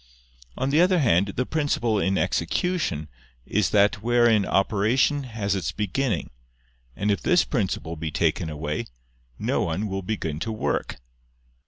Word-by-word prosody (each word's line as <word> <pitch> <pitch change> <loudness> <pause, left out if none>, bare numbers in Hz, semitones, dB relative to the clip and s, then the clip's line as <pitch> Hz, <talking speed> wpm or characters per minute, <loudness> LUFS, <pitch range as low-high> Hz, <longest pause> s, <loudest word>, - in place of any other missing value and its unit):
On 135 - -1
the 155 +4 +4
other 185 +1 +4
hand, 100 - +3
the 125 - 0
principle 120 -8 0
in 95 0 +1
execution 160 - -1 0.4
is 100 -3 +1
that 100 0 +3
wherein 120 -3 +3
operation 115 +8 +2
has 110 -5 -2
its 95 -5 -2
beginning; 105 0 -2 0.6
and 105 +1 0
if 100 - 0
this 180 0 +3
principle 95 - -2
be 80 0 -4
taken 80 +2 0
away, 75 0 -4 0.5
no - - 0
one 85 +6 -1
will 95 -1 -3
begin 90 -6 -3
to 110 - -3
work. 110 - -2
105 Hz, 145 wpm, -25 LUFS, 90-125 Hz, 0.6 s, the